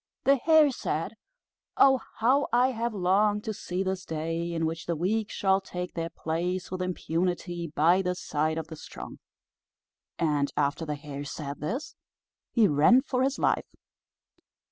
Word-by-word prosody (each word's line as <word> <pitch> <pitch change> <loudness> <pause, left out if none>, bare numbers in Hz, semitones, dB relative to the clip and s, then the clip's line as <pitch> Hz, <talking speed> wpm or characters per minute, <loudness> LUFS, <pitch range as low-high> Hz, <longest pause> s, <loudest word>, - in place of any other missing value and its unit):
The 275 +1 +5
Hare 310 +1 +5
said, - - -3 0.6
"Oh, 265 -1 +6 0.2
how 260 +6 +3
I 245 +2 +4
have 235 0 -2
longed 205 +3 +2
to 220 - -3
see 185 -1 -3
this 190 0 -2
day, 165 +2 -3
in 165 -1 -1
which 165 +1 -4
the 170 - 0
weak 205 +6 0
shall 195 0 +2
take 180 -1 -6
their 165 -1 -3
place 175 +3 -3
with 185 0 -3
impunity 175 -1 -2
by 170 +5 +4
the 180 -1 -1
side 155 -2 -1
of 160 - -3
the 160 - -9
strong." - - -9 1.0
And 150 -3 +1
after 145 +3 0
the 150 - -2
Hare 145 -1 -7
said 145 0 -6
this, 255 - -4 0.6
he 225 -4 +4
ran 170 - +5
for 255 -4 -1
his 270 +1 +1
life. - - +1
180 Hz, 160 wpm, -28 LUFS, 160-220 Hz, 1.0 s, Oh